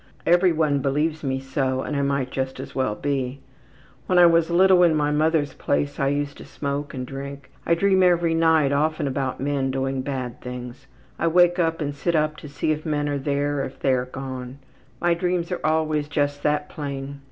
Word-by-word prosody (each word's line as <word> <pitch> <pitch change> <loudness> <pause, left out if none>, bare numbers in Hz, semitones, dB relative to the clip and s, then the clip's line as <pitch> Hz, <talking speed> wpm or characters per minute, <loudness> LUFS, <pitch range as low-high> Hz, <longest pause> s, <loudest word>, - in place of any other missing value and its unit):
Everyone 165 -5 +3
believes 150 +4 -1
me 135 -1 -1
so 130 -1 -1
and 150 - -4
I 140 - +1
might 140 -2 -1
just 130 0 -3
as - - -7
well 130 -6 0
be. 135 -1 -2 0.7
When 180 - +2
I 175 - +8
was 165 -1 +4
little 185 +1 +5
in 170 -3 +5
my 150 -1 +1
mother's 150 -2 +1
place 145 +1 -1
I 135 - +2
used 145 0 -2
to - - -10
smoke 145 0 -4
and 130 -1 -4
drink. 140 +1 -8 0.2
I 170 - +4
dream 190 +2 +3
every 175 -2 +3
night 160 -3 +3
often 155 +2 +1
about 135 -1 -2
men 140 -1 -1
doing 135 0 -1
bad 130 -3 -5
things. 125 +2 -8 0.3
I 170 - +1
wake 175 +1 +4
up 165 -1 0
and 145 -1 -2
sit 165 +4 -1
up 155 0 +1
to 150 - -10
see 145 +2 -1
if 155 0 -2
men 145 -2 -1
are 145 -1 -1
there 145 +1 -1
or - - 0
if 130 - -10
they 135 - +2
are 125 0 0
gone. 130 0 -7 0.4
My 175 0 +2
dreams 175 0 -1
are 180 - -3
always 155 -1 +1
just 145 -1 -1
that 150 0 0
plain. 140 -2 -6
145 Hz, 205 wpm, -23 LUFS, 135-160 Hz, 0.7 s, I